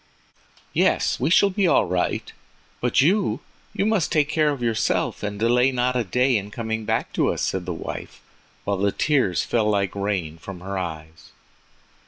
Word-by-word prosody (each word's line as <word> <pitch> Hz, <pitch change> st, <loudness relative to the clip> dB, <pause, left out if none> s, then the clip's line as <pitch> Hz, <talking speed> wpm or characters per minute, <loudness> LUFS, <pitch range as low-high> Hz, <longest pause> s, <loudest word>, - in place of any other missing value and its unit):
"Yes, -, -, +2 dB
we -, -, +1 dB
shall 200 Hz, +3 st, +5 dB
be 190 Hz, 0 st, +1 dB
all 150 Hz, -, +4 dB
right—but 90 Hz, +7 st, -2 dB
you—you 180 Hz, -, -1 dB
must 215 Hz, -6 st, +1 dB
take 150 Hz, -2 st, +2 dB
care 155 Hz, -1 st, +2 dB
of 140 Hz, -4 st, -3 dB
yourself 115 Hz, -2 st, 0 dB
and 105 Hz, 0 st, -4 dB
delay 125 Hz, +3 st, +3 dB
not 125 Hz, 0 st, 0 dB
a 125 Hz, -, +1 dB
day 125 Hz, +5 st, +2 dB
in 100 Hz, 0 st, -5 dB
coming 110 Hz, 0 st, -4 dB
back -, -, -1 dB
to -, -, +2 dB
us," -, -, -3 dB
said 95 Hz, -2 st, -2 dB
the -, -, -1 dB
wife, 80 Hz, -, -7 dB, 0.4 s
while 100 Hz, -1 st, -1 dB
the 100 Hz, +1 st, +1 dB
tears 130 Hz, -, +1 dB
fell 110 Hz, -3 st, +1 dB
like 100 Hz, -2 st, 0 dB
rain 95 Hz, -6 st, -2 dB
from 90 Hz, 0 st, -9 dB
her 95 Hz, +2 st, -5 dB
eyes. 80 Hz, -3 st, -6 dB
110 Hz, 170 wpm, -23 LUFS, 95-135 Hz, 0.4 s, shall